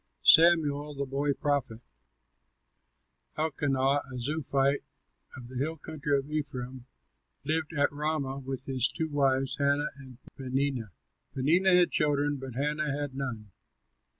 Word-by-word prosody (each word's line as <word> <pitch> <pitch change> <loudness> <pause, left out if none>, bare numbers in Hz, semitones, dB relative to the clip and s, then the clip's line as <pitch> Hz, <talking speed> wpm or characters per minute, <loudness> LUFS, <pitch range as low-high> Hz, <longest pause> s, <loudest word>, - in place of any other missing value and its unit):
SAMUEL 150 -3 +5
THE 140 0 -2
BOY 140 +2 -1
PROPHET 140 -6 -2 1.6
Elkanah, 140 -3 +1
a 130 - -6
Zuphite 140 +1 0 0.6
of 125 -2 -9
the 130 +1 -8
hill 160 +4 -2
country 150 -2 -2
of 135 0 -4
Ephraim, 130 -4 -4 0.6
lived 155 +2 0
at 145 0 +2
Ramah 145 -2 -1
with 135 -1 0
his 130 -1 +2
two 160 +3 -2
wives, 135 -2 +1
Hannah 140 +1 +2
and 130 -3 -12 0.2
Peninnah. 130 -3 -2 0.5
Peninnah 175 +8 +4
had 180 -1 +5
children, 145 -1 +1
but 130 -3 -8
Hannah 150 +2 -1
had 145 -1 -3
none. 120 -7 -5
140 Hz, 125 wpm, -29 LUFS, 135-150 Hz, 1.6 s, SAMUEL